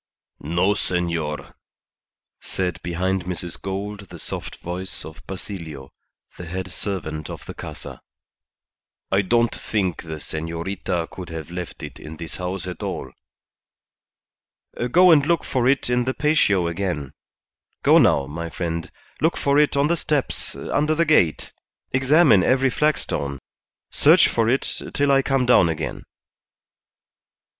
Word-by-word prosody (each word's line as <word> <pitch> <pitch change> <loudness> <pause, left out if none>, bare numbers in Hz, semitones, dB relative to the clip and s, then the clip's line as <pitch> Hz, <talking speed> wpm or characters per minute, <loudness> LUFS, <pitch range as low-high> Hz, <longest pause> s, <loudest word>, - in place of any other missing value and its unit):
"No, 85 +6 +1
senor," 85 -6 -2 0.9
said 90 -2 -3
behind 90 +1 -1
Mrs. 90 -1 -4
Gould 100 +1 -5
the - - -9
soft - - -5
voice 90 +2 -4
of 80 0 -10
Basilio, 85 -8 -7 0.5
the 85 - -7
head 95 +1 -5
servant 80 -8 -4
of - - -8
the - - -7
Casa. - - -9 1.1
"I 95 +1 +4
don't 115 +4 +2
think 95 -6 -1
the 80 -1 -6
senorita 85 +3 -3
could 90 -2 -8
have 80 0 -7
left 90 -1 -6
it - - -8
in 80 +1 -9
this 85 0 -6
house 90 0 -3
at 90 -2 -6
all." - - -4 1.8
"Go 180 +6 +7
and 150 -3 +6
look 170 +2 +1
for 125 -2 0
it 135 +1 +2
in 125 0 +1
the 130 - -1
patio 125 - +3
again. 85 -5 -3 0.7
Go - - +7
now, 70 - +4
my 85 +4 -5
friend; 85 -1 -3 0.3
look 160 +2 +2
for 140 +1 +3
it 150 -1 +3
on 140 - +4
the 170 +3 +2
steps, 150 -4 -1
under 150 +2 0
the 170 +1 +2
gate; 90 - +2 0.4
examine 130 - +5
every 130 +3 +3
flagstone; 115 - 0 0.5
search - - +6
for 115 -1 +1
it 130 +3 0
till 145 -1 +3
I 135 0 +5
come 135 -1 +1
down 110 -8 +5
again. 80 -1 -4
95 Hz, 140 wpm, -23 LUFS, 85-130 Hz, 1.8 s, Go